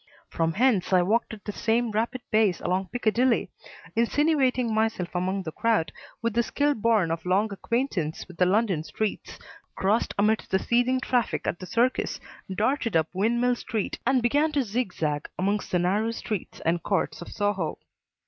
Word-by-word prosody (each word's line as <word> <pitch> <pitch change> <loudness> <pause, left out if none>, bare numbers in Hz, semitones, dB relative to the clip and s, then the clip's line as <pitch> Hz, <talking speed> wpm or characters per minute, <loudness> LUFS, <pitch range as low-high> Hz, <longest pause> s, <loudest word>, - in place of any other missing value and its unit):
From 165 0 0
hence 225 -3 +2
I 180 -1 +5
walked 220 +6 +1
at 220 -2 -10
the 210 - -3
same 230 +2 0
rapid 230 +4 -1
pace 215 -5 +3
along 185 +1 -1
Piccadilly, 245 +2 +1 0.4
insinuating 255 -1 +2
myself 220 -6 0
among 185 +2 -1
the 160 - -5
crowd 225 -3 +1 0.3
with 230 -1 0
the 235 - +3
skill 290 +5 +1
born 215 -7 +2
of 165 0 -3
long 200 +4 +1
acquaintance 200 - -2
with 180 -2 -13
the 180 - +4
London 195 -5 +1
streets, 215 +5 -4 0.4
crossed 205 +4 +1
amidst 215 +2 +1
the 190 - +3
seething 245 +5 +1
traffic 230 - 0
at 175 - -2
the 185 - -8
Circus, 240 +5 0 0.3
darted 230 +3 0
up 160 -1 +2
Windmill 235 +6 +2
Street 220 -3 -3
and 255 -1 +2
began 290 +6 +2
to 285 -2 +2
zigzag 185 -10 -2
amongst 200 +2 -1
the 180 - +1
narrow 195 +6 +1
streets 215 -4 -5
and 165 +1 0
courts 195 -3 -1
of 175 - -8
Soho. 205 -6 -1
215 Hz, 165 wpm, -26 LUFS, 185-235 Hz, 0.4 s, I